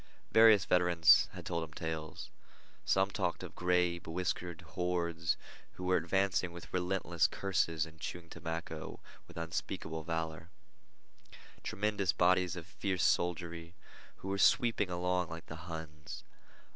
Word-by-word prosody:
Various 110 Hz, -3 st, +7 dB
veterans 90 Hz, -2 st, +5 dB
had -, -, -8 dB
told 85 Hz, -2 st, -1 dB
him 80 Hz, -1 st, -9 dB
tales. 80 Hz, -2 st, -5 dB, 0.5 s
Some 95 Hz, +1 st, +3 dB
talked 90 Hz, -3 st, -1 dB
of -, -, -8 dB
gray, 90 Hz, -1 st, +2 dB
bewhiskered 85 Hz, 0 st, -3 dB
hordes 85 Hz, -2 st, 0 dB, 0.4 s
who 90 Hz, -, -9 dB
were 90 Hz, 0 st, +3 dB
advancing 90 Hz, +1 st, +1 dB
with 85 Hz, 0 st, -11 dB
relentless 90 Hz, -2 st, +1 dB
curses 85 Hz, -4 st, 0 dB
and 80 Hz, -1 st, -15 dB
chewing 85 Hz, +4 st, -6 dB
tobacco 80 Hz, -2 st, -6 dB, 0.3 s
with 85 Hz, -, -13 dB
unspeakable 80 Hz, -1 st, -3 dB
valor; 80 Hz, 0 st, -3 dB, 1.1 s
tremendous 100 Hz, -2 st, 0 dB
bodies 90 Hz, 0 st, +3 dB
of 85 Hz, -3 st, -7 dB
fierce 95 Hz, 0 st, -2 dB
soldiery 85 Hz, -1 st, 0 dB, 0.4 s
who 95 Hz, -, -7 dB
were 100 Hz, 0 st, -1 dB
sweeping 115 Hz, -4 st, +4 dB
along 90 Hz, 0 st, 0 dB
like 80 Hz, 0 st, -7 dB
the 80 Hz, +3 st, -9 dB
Huns. 75 Hz, -2 st, -7 dB
85 Hz, 130 wpm, -33 LUFS, 80-90 Hz, 1.1 s, Various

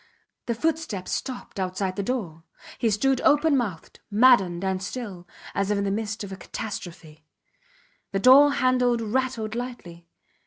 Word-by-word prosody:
The 235 Hz, -, 0 dB
footsteps 310 Hz, -, -2 dB
stopped 250 Hz, -5 st, -5 dB
outside 185 Hz, 0 st, -2 dB
the 200 Hz, -, -2 dB
door. 195 Hz, -8 st, -4 dB, 0.4 s
He 230 Hz, -, +2 dB
stood 260 Hz, +5 st, +1 dB
openmouthed, 275 Hz, -, +1 dB
maddened 205 Hz, -6 st, +4 dB
and 190 Hz, -1 st, -1 dB
still, 195 Hz, -5 st, -6 dB, 0.3 s
as 195 Hz, 0 st, -1 dB
if 210 Hz, -, +1 dB
in 200 Hz, -, 0 dB
the 195 Hz, -, -1 dB
midst 210 Hz, 0 st, -3 dB
of 200 Hz, -, -7 dB
a 190 Hz, -, -6 dB
catastrophe. 170 Hz, -8 st, -8 dB, 0.8 s
The 195 Hz, -, -1 dB
door 275 Hz, +7 st, +7 dB
handle 250 Hz, -2 st, +2 dB
rattled 230 Hz, -1 st, -2 dB
lightly. 225 Hz, -9 st, -7 dB
215 Hz, 145 wpm, -25 LUFS, 190-255 Hz, 0.8 s, door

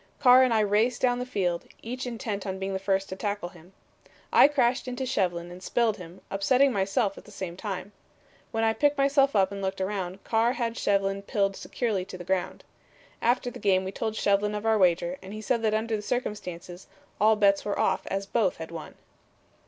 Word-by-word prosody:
Carr 255 Hz, -2 st, +7 dB
and 255 Hz, -2 st, +4 dB
I 220 Hz, -1 st, +3 dB
raced 215 Hz, +4 st, +2 dB
down 245 Hz, -1 st, +2 dB
the 250 Hz, -, -4 dB
field, 180 Hz, -7 st, -1 dB, 0.2 s
each 250 Hz, +3 st, -5 dB
intent 220 Hz, -4 st, -4 dB
on 190 Hz, 0 st, -3 dB
being 195 Hz, 0 st, -3 dB
the 190 Hz, -, -1 dB
first 195 Hz, 0 st, 0 dB
to 185 Hz, -, -5 dB
tackle 205 Hz, -2 st, -3 dB
him. 175 Hz, 0 st, -17 dB, 0.6 s
I -, -, +8 dB
crashed 260 Hz, -3 st, +1 dB
into 250 Hz, +1 st, -3 dB
Shevlin 175 Hz, -6 st, -1 dB
and 180 Hz, +1 st, -10 dB
spilled 225 Hz, +2 st, +1 dB
him, 180 Hz, +1 st, -11 dB
upsetting 255 Hz, +8 st, +3 dB
myself 195 Hz, +1 st, 0 dB
at -, -, -17 dB
the -, -, -14 dB
same 185 Hz, -4 st, -6 dB
time. 195 Hz, 0 st, -5 dB, 0.6 s
When 225 Hz, 0 st, -1 dB
I 225 Hz, 0 st, +3 dB
picked 290 Hz, +5 st, +2 dB
myself 275 Hz, -1 st, +3 dB
up 190 Hz, -1 st, +3 dB
and 200 Hz, 0 st, -5 dB
looked 190 Hz, 0 st, -2 dB
around, 190 Hz, -1 st, -3 dB
Carr 230 Hz, +2 st, +2 dB
had 235 Hz, -3 st, -2 dB
Shevlin 195 Hz, -2 st, 0 dB
pinned 200 Hz, -1 st, 0 dB
securely 215 Hz, -5 st, -2 dB
to 190 Hz, -1 st, -9 dB
the 175 Hz, -, -8 dB
ground. 185 Hz, 0 st, -2 dB, 0.6 s
After 245 Hz, +1 st, +1 dB
the -, -, -10 dB
game 190 Hz, -2 st, +2 dB
we 190 Hz, -, -4 dB
told 220 Hz, +2 st, -3 dB
Shevlin 205 Hz, 0 st, +1 dB
of 210 Hz, -, -6 dB
our 220 Hz, -1 st, +3 dB
wager 175 Hz, 0 st, +2 dB
and 190 Hz, +2 st, -9 dB
he 215 Hz, -, -6 dB
said 235 Hz, +1 st, 0 dB
that 215 Hz, -1 st, +1 dB
under 220 Hz, +1 st, -1 dB
the 210 Hz, -, -3 dB
circumstances 190 Hz, -6 st, -5 dB, 0.3 s
all 220 Hz, +1 st, +5 dB
bets 200 Hz, -2 st, +3 dB
were 205 Hz, -, -2 dB
off -, -, 0 dB
as 195 Hz, 0 st, -2 dB
both 200 Hz, -2 st, 0 dB
had 160 Hz, 0 st, -7 dB
won." 165 Hz, -2 st, -8 dB
205 Hz, 210 wpm, -27 LUFS, 190-230 Hz, 0.6 s, I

